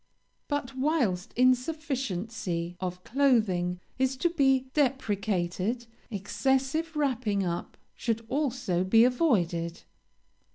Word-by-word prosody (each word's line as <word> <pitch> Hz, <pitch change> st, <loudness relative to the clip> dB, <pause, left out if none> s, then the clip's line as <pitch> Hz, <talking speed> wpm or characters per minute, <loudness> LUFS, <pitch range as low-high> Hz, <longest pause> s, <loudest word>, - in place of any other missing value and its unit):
"But, 290 Hz, -3 st, -2 dB
whilst 260 Hz, -, 0 dB
insufficiency 245 Hz, -, 0 dB
of 180 Hz, -1 st, -4 dB
clothing 215 Hz, -10 st, +2 dB, 0.2 s
is 265 Hz, 0 st, +1 dB
to 345 Hz, +5 st, +1 dB
be 270 Hz, -5 st, +3 dB
deprecated, 215 Hz, -, 0 dB, 0.2 s
excessive 265 Hz, -, 0 dB
wrapping 240 Hz, -9 st, 0 dB
up 170 Hz, -1 st, -4 dB, 0.2 s
should 230 Hz, -1 st, -2 dB
also 250 Hz, -, 0 dB
be 225 Hz, +5 st, +5 dB
avoided. 180 Hz, -, +1 dB
235 Hz, 90 wpm, -28 LUFS, 185-270 Hz, 0.2 s, be